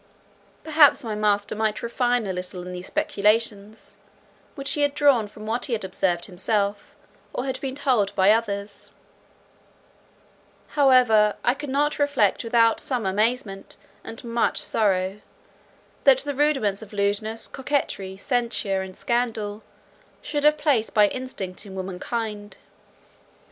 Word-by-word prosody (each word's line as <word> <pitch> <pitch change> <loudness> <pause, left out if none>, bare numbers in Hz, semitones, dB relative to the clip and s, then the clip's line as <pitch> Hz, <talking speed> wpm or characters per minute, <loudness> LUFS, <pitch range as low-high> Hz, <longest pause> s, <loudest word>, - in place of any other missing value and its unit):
Perhaps 305 -4 +5
my 225 -2 -3
master 205 -1 +1
might 215 0 -1
refine 245 0 0
a 190 - -2
little 180 0 -6
in 180 - -7
these 180 0 -7
speculations, 210 0 -1 0.6
which 275 -3 -3
he 295 - 0
had 285 0 +1
drawn 275 -7 +4
from 215 +1 -12
what 230 +3 -2
he 245 - -1
observed 185 -3 -1
himself, 200 +2 -2 0.4
or 250 - -3
had 260 -1 -4
been 265 -1 -4
told 255 -8 +1
him - - -19
by 190 +1 +5
others; 205 -2 -2 1.8
however, 250 -7 +4
I 245 - +3
could 290 +1 -7
not 290 +3 0
reflect 285 -9 +2
without 230 -1 +3
some 245 -6 -2
amazement, 210 +1 -1 0.3
and 225 - -9
much 235 0 0
sorrow, 195 -1 0 0.8
that 270 -2 +7
the 285 0 -3
rudiments 270 -9 +1
of 220 -1 -12
lewdness, 210 +2 -1
coquetry, 255 -9 -3
censure, 230 -4 -1
and 190 -1 -8
scandal, 225 -3 -2 0.6
should 290 -1 -2
have 300 0 +5
place 285 -7 +1
by 210 -2 +4
instinct 205 -9 -6
in 190 - -10
womankind. 205 +3 -5
220 Hz, 135 wpm, -24 LUFS, 200-255 Hz, 1.8 s, that